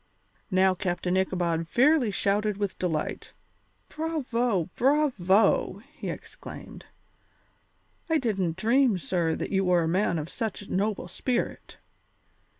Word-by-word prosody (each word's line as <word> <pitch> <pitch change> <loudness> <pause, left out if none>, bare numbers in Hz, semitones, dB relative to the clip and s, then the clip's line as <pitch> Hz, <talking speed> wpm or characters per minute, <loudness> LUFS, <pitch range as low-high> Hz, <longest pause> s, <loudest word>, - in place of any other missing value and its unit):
Now 190 -1 +4
Captain 180 -1 -1
Ichabod 175 -3 0
fairly 265 - +4
shouted 205 +1 0
with 200 -2 -3
delight. 160 -4 -3 0.5
"Bravo! 245 - -1
Bravo!" 220 -8 +2
he - - -6
exclaimed; - - -9 1.2
"I 320 - +3
didn't 195 - -1
dream, 235 +1 +3
sir, 165 +1 0
that - - -4
you 195 -1 +2
were 180 -2 +3
a - - 0
man 175 0 +1
of 155 0 -3
such 220 +1 -4
a - - -8
noble 200 -1 -1
spirit. 240 +7 -3
195 Hz, 120 wpm, -27 LUFS, 180-235 Hz, 1.2 s, Now